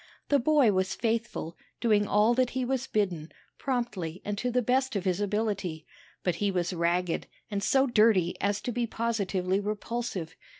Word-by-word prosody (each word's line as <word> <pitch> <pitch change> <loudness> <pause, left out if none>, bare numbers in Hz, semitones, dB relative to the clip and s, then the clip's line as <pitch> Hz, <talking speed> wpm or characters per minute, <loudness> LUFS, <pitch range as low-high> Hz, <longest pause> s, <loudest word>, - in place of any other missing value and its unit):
The 285 - +4
boy 280 -3 +4
was 190 0 0
faithful, 225 -7 -2 0.2
doing 210 -3 +3
all 210 +4 +4
that 255 0 +2
he 255 - 0
was 265 0 -1
bidden, 180 -7 -1 0.3
promptly 215 -10 -2
and 205 - -1
to 250 - -1
the 250 0 +1
best 260 +1 +1
of 200 - -2
his 185 +1 +1
ability, 200 -6 -1 0.4
but 175 -2 0
he 205 - +2
was 180 -1 -1
ragged, 170 0 0 0.2
and 200 -1 -1
so 265 +7 +3
dirty 215 -8 +3
as 205 +1 0
to 245 - -3
be 240 0 -1
positively 200 -5 0
repulsive. 205 -4 -3
210 Hz, 170 wpm, -28 LUFS, 185-240 Hz, 0.4 s, The